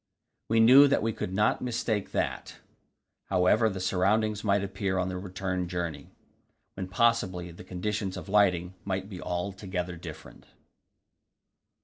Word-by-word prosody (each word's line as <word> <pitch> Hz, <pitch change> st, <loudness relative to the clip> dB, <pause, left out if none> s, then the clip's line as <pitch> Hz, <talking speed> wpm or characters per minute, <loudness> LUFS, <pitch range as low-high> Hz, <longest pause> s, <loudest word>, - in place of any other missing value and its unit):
We 115 Hz, 0 st, +3 dB
knew 130 Hz, +6 st, +8 dB
that 140 Hz, -, +1 dB
we 115 Hz, 0 st, 0 dB
could 90 Hz, -, -4 dB
not 105 Hz, +3 st, +1 dB
mistake 115 Hz, -4 st, -2 dB
that, -, -, -2 dB, 0.7 s
however 95 Hz, +4 st, +3 dB
the 95 Hz, -2 st, -5 dB
surroundings 100 Hz, +3 st, +1 dB
might 100 Hz, -1 st, +2 dB
appear 95 Hz, -1 st, -2 dB
on 90 Hz, 0 st, 0 dB
the 90 Hz, -, -4 dB
return 90 Hz, -1 st, -3 dB
journey, 85 Hz, -3 st, -4 dB, 0.6 s
when 95 Hz, -1 st, -5 dB
possibly 95 Hz, -4 st, +1 dB
the 85 Hz, -, -11 dB
conditions 95 Hz, +2 st, -3 dB
of -, -, -8 dB
lighting 95 Hz, -3 st, +2 dB
might 95 Hz, 0 st, -3 dB
be 95 Hz, -3 st, -8 dB
altogether 90 Hz, 0 st, -4 dB
different. -, -, -11 dB
95 Hz, 135 wpm, -28 LUFS, 90-105 Hz, 0.7 s, knew